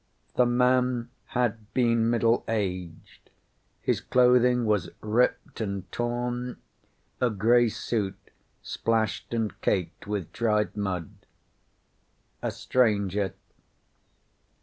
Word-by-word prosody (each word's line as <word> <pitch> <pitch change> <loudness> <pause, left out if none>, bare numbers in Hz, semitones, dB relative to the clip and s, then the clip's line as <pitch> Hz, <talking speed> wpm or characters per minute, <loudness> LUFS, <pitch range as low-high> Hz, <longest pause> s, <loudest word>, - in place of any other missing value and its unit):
The 125 - +4
man 125 -1 +2
had 115 -3 -2
been 115 -2 +3
middle 115 0 +2
aged. 90 -6 -4 0.5
His - - +1
clothing 125 -1 +4
was 105 -5 +1
ripped 115 +2 0
and 100 -3 -4
torn, 120 +1 -2 0.6
a 125 - +4
gray 115 +3 +4
suit, 110 -2 -2 0.5
splashed 115 -1 -1
and 115 -3 -2
caked 90 -2 -1
with 100 -5 -3
dried 105 -2 +1
mud. 95 -5 -3 1.3
A - - -1
stranger. 100 -5 +1
115 Hz, 95 wpm, -27 LUFS, 100-120 Hz, 1.3 s, The